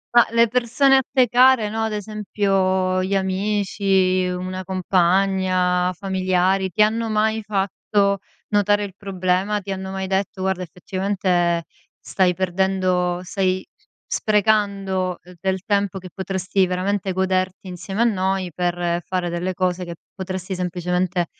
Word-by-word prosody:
Ma, 240 - +7
le 230 0 +4
persone 250 +4 +3
a - - +4
te 255 -2 +4
care, 245 -2 +5
no, 220 +1 -1
ad 220 - -2
esempio, 195 -3 0
gli 195 +1 -1
amici, 190 -1 +1
una 185 +1 -4
compagna, 185 0 +1
familiari; 190 0 0
ti 210 +4 +3
hanno 225 +1 0
mai 220 +1 +1
fatto 200 0 0 0.3
notare 205 0 +2
il 195 -2 -6
problema? 195 +1 -1
Ti 200 0 -7
hanno 190 0 -4
mai 190 0 -3
detto: 190 0 -2
"Guarda, 190 -1 -1
effettivamente, 180 -1 -1 0.4
stai 180 -2 +1
perdendo 185 -1 0
stai 185 -1 -1 0.4
sprecando 200 -3 +1 0.2
del 190 -1 -1
tempo, 200 -2 0
che 185 -1 -9
potresti, 190 0 0
veramente, 190 +1 -1
goderti 185 0 -1
insieme 190 +4 -4
a - - +6
noi, 190 -4 0
per 175 0 -1
fare 180 -1 -2
delle 180 +1 -2
cose 180 0 0
che 170 -1 -7 0.2
potresti, 185 0 -5
semplicemente 180 0 -1
190 Hz, 130 wpm, -22 LUFS, 185-200 Hz, 0.4 s, Ma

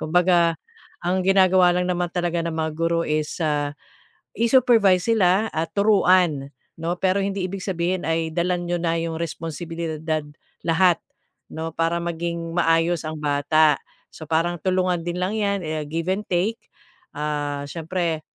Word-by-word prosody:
Kumbaga 170 0 +3 0.5
ang 185 +2 +1
ginagawa 185 -2 +5
lang 180 0 0
naman 175 -1 0
talaga 175 -1 -1
ng 170 - -2
mga 160 0 -1
guro 165 +1 +1
is, 155 0 -2
ah, 145 -2 0 0.6
i-supervise 230 -6 +4
sila 200 0 +3
at 160 +1 -2
turuan 185 -8 +3 0.3
no, 175 +2 -2
pero 190 +2 +1
hindi 195 -1 -2
ibig 190 +1 -5
sabihin 180 -1 -1
ay 160 -1 -1
dala 180 +1 +1
niyo 175 0 -2
na 165 0 +1
'yung 165 -1 -3
responsibilidad 160 -1 -4 0.4
lahat 170 +1 +4 0.5
no, 160 +1 -4
para 165 +1 0
maging 170 0 -3
maayos 165 -1 +2
ang 155 - -4
bata. 150 +1 +3 0.4
So, 160 - -10
parang 165 +2 +1
tulungan 185 -2 0
din 175 - -2
lang 190 +4 -1
'yan, 200 -2 0
eh, 155 -1 -3
give 165 +4 -3
and 200 +3 -1
take, 190 +6 0 0.6
ah, 145 -1 -2
syempre. 165 -1 -3
170 Hz, 145 wpm, -23 LUFS, 160-185 Hz, 0.6 s, ginagawa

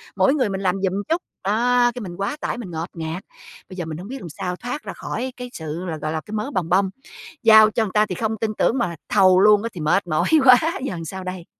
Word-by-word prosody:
mỗi 270 - +3
người 265 -8 +1
mình 195 0 -3
làm 185 -1 +1
giùm 190 -1 +1 0.2
chút, 335 +2 +1 0.2
đó, 240 +4 +3
cái 245 - -5
mình 175 -4 -7
quá 200 +10 -2
tải - - -2
mình 200 -8 -7
ngột 165 +2 -4
ngạt. 165 +2 -5 0.5
Bây 185 - -9
giờ 175 - -3
mình 160 -1 -6
hổng 180 +4 -8
biết 270 +2 -6
làm 170 - -8
sao 180 +4 -4
thoát 245 +9 -6
ra - - -6
khỏi 260 0 -5
cái 250 0 -7
sự 160 +2 -5
là, 165 -3 -4
gọi 155 0 -3
là, 160 - -2
cái 210 - -9
mớ 215 +7 -3
bòng 175 -7 -2
bong, 190 +2 +3 0.5
giao 220 -1 +8
cho 225 - +1
người 205 - -4
ta 210 0 +4
thì 185 -4 -5
không 220 -1 -2
tin 220 -1 0
tưởng 250 - +2
mà 180 -9 -1
thầu 185 -3 +5
luôn 210 +1 +5
á 230 - -2
thì 170 - -7
mệt 175 +4 +1
mỏi 155 -2 0 0.2
quá, 250 -1 +9 0.3
giờ 190 - -3
sao 190 +3 -6
đây? 185 -2 -6
195 Hz, 270 wpm, -22 LUFS, 175-225 Hz, 0.5 s, quá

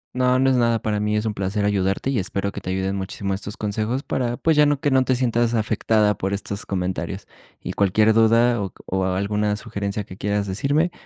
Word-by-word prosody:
No, 125 0 +3
no 135 0 +3
es - - +3
nada 115 -1 +2
para 105 -2 -1
mí, 105 0 0
es 105 - -1
un 110 - -1
placer 100 +1 -1
ayudarte 100 +5 0
y 125 - +1
espero 100 +1 -2
que - - -7
te - - -6
ayuden 95 +1 -1
muchísimo 95 0 -3
estos 100 +1 -6
consejos 110 +5 -2
para, 120 -2 -2
pues, 160 -1 +2
ya 150 0 +5
no 145 -1 +1
que 145 - 0
no 130 -1 +4
te 130 0 +1
sientas 120 -1 +1
afectada 110 -1 +2
por 95 +1 -2
estos 100 0 -4
comentarios. 90 -1 -3 0.4
Y - - -4
cualquier 105 +3 +3
duda 115 +1 +4
o 95 - -4
o 95 0 -1
alguna 105 +3 0
sugerencia 100 0 -4
que 90 - -11
quieras 100 +1 -1
decirme, 140 - 0
105 Hz, 215 wpm, -22 LUFS, 100-120 Hz, 0.4 s, ya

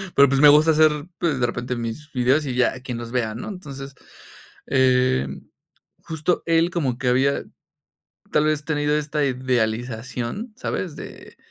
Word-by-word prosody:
pero, 140 0 +7
pues, 135 +1 +1
me 150 - +9
gusta 150 +2 +6
hacer, 155 0 +5 0.3
pues, 160 -7 0
de 120 - +2
repente 125 +1 -3
mis 120 +6 -6
videos 130 +3 +2
y 130 -3 -3
ya, 125 +1 +2
quien 125 -2 -5
los 120 0 -7
vea, 110 -4 -1
¿no?, 115 - -6
entonces, 140 -8 -8 0.7
eh, 125 - +2 0.7
justo 160 +2 -1
él 165 +1 +3
como 140 -9 -1
que 130 -1 -3
había, 130 +3 +2 0.9
tal 150 - +3
vez, 155 -1 0
tenido 150 0 0
esta 150 0 0
idealización, 125 - -2
¿sabes?, 185 - -4
de - - -11
135 Hz, 155 wpm, -22 LUFS, 125-150 Hz, 0.9 s, me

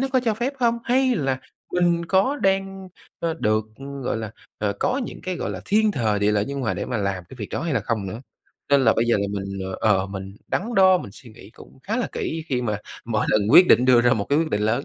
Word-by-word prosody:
nó 270 - 0
có 260 - +4
cho 220 -2 +2
phép 240 +5 -2
hông? 235 -1 +2
Hay 260 0 +2
là 135 -5 -1 0.3
mình 175 -1 +2
có 195 - +2
đang, 195 -2 -1 0.3
ờ, 165 -1 -1
được 110 -3 +1 0.4
gọi 125 - -1
là, 110 -2 -5 0.3
ờ, 105 -1 0
có 260 +2 +1
những - - -9
cái, 185 -1 -3
gọi - - -3
là, - - -5
thiên 215 +1 +3
thời, 110 - 0
địa 105 +1 +2
lợi, 105 -1 +1
nhân 140 +2 -4
hòa 115 - -1
để - - -3
mà 125 - -2
làm 95 -3 -2
cái - - -9
việc 105 - -5
đó - - -3
hay 165 -4 -1
là 115 - +1
không 105 -1 -2
nữa? 110 +7 -7 0.5
Nên 140 - +5
là 110 - +6
bây 115 - +2
giờ 120 - +3
thì 100 0 -1
mình, 100 -1 -4
ờ, - - -5 0.2
ờ, 95 - -2
mình 95 0 -8
đắn 230 +5 -2
đo, 185 -1 +6
mình 100 - -8
suy 120 - -14
nghĩ 110 -2 -15
cũng - - -16
khá 220 +4 -2
là 250 - -1
kỹ 160 0 -3
khi 125 -2 0
mà 105 -3 -1 0.3
mỗi 115 -2 -1
lần 110 - +3
quyết 180 +7 +8
định 125 - +6
đưa 125 -2 +6
ra 120 0 +3
một 100 -2 0
cái 145 - +3
quyết 160 -1 0
định 105 - 0
lớn. 120 +6 0
130 Hz, 270 wpm, -23 LUFS, -, 0.5 s, quyết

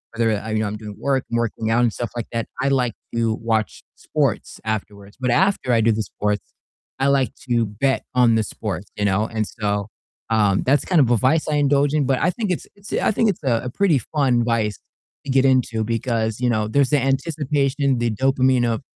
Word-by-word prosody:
whether, 115 -1 +2
uh, 110 - -7
you 110 0 0
know, 110 - 0
I'm 105 +1 -4
doing 105 -1 -9
work, 135 -2 0
I'm 115 - +1
working 115 -1 -1
out 120 +1 +3
and 120 - +3
stuff 120 +1 -5
like 120 - -4
that, 115 -1 -2 0.2
I 135 - +1
like 125 -4 +1 0.2
to 115 -1 +1
watch 110 -1 -2
sports - - -2
afterwards. 105 -1 -5
But 125 -2 0
after 185 -5 +2
I 115 - +4
do 115 - +3
the 110 0 0
sports, 105 +1 -2 0.6
I 135 - +2
like 140 -2 +2 0.2
to 120 -1 +2
bet 120 +7 -1
on 125 -2 +4
the 110 - +2
sports, 100 -2 -5
you 105 - -1
know? 100 +2 +2
And 110 -2 -2
so, 105 -2 -2 0.4
um, 105 -4 +2
that's 140 +1 +2
kind 175 -5 +3
of 125 - +3
a 120 - +4
vice 150 +6 +2
I 150 - +1
indulge 145 0 +2
in, 150 -3 +2
but 130 0 +1
I 180 - +3
think 210 +1 -2
it's 180 - -3
it's 200 0 -11
I - - +2
think 225 +1 +2
it's 180 -6 -3
a, 120 -4 +1
a - - -2
pretty 170 +3 +2
fun 125 -3 +1
vice 110 -4 0 0.5
to - - -8
get 135 0 +4
into 125 -4 +2
because, 115 -1 -1
you 125 -1 +1
know, 110 -2 0
there's 140 +3 +2
the 145 - +4
anticipation, 140 -1 0
the 120 -1 0
dopamine 130 +1 +2
of, 115 +2 -1
120 Hz, 225 wpm, -21 LUFS, 110-135 Hz, 0.6 s, I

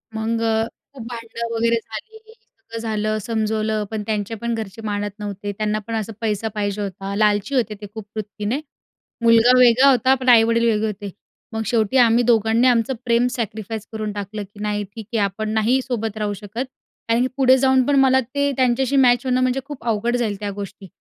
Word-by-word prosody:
मग 225 +1 -1
अ, 225 -1 +1 0.3
खूप 255 -5 -9
भांडणं 230 -1 -5
वगैरे 230 +1 +2
झाली. 230 - -7 0.5
सगळं 230 - -5
झालं 215 -1 -1
समजवलं, 215 0 -1
पण 215 -1 -3
त्यांचे 210 0 -2
पण 235 0 -1
घरचे 220 -1 -6
मानत 205 0 -2
नव्हते. 205 0 -5
त्यांना 215 +1 -1
पण 230 - -4
असा 220 0 -3
पैसा 220 -1 -1
पाहिजे 205 0 -2
होता. 195 0 -5
लालची 210 +5 +1
होते 225 -4 0
ते - - -6
खूप 220 -2 -7
वृत्तीने. 210 +4 -3 0.6
मुलगा 230 +1 +6
वेगळा 250 +2 +6
होता, 260 +1 +4
पण 260 -1 -1
आई-वडील 230 0 +5
वेगळे 220 0 +1
होते. 205 -1 -5 0.4
मग 220 - -2
शेवटी 225 +2 +1
आम्ही 240 -1 +5
दोघांनी 230 +1 +3
आमचं 245 +1 +2
प्रेम 235 0 +3
सॅक्रिफाईस 220 -2 -4
करून 215 -1 -3
टाकलं 205 +1 -5
की 205 +1 -16
नाही 210 0 -1
ठीक 205 +2 -10
आहे 225 - +1
आपण 200 +2 -2
नाही 225 +4 +2
सोबत 225 -4 -3
राहू 210 -1 -1
शकत, 210 +5 -5 0.4
कारण 230 +1 +2
की 255 - +2
पुढे 260 -1 +5
जाऊन 265 0 +4
पण 285 - +2
मला 265 -1 +5
ते 280 +3 -1
त्यांच्याशी 260 +1 +2
मॅच 245 -2 +4
होणं 255 0 +1
म्हणजे 255 +1 +1
खूप 290 -2 -9
अवघड 230 +2 +1
जाईल 220 -4 -1
त्या 205 -1 -3
गोष्टी. 200 -1 -8
225 Hz, 190 wpm, -21 LUFS, 210-245 Hz, 0.6 s, मुलगा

